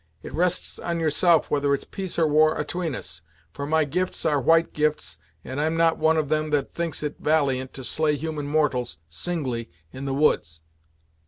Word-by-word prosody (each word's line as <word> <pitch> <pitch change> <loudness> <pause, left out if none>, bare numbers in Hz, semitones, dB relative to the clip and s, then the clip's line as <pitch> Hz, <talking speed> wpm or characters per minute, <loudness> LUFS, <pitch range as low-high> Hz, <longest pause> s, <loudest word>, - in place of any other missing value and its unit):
It - - -8
rests 180 +1 0
on 170 -1 -2
yourself 165 +1 +3
whether 140 -1 +2
it's - - -6
peace 190 -3 -6
or 165 - +4
war 155 +1 +4
atween 160 0 -2
us; 80 -5 -7 0.3
for 140 +8 -5
my 160 +1 +3
gifts 180 +6 -2
are 145 -3 +2
white 165 +5 +3
gifts, 150 - 0 0.2
and 135 +3 -4
I'm 160 +2 0
not 165 0 +3
one 160 +1 +3
of 155 -2 0
them 155 +1 0
that 145 -2 -1
thinks 170 -3 -2
it 150 - -3
valiant 135 -4 +1
to 135 - -7
slay 150 +4 +1
human 150 -1 -4
mortals, 145 -5 0
singly, 125 - -3 0.2
in 135 +1 -6
the 135 - -1
woods." 85 - +1
150 Hz, 185 wpm, -25 LUFS, 140-160 Hz, 0.3 s, or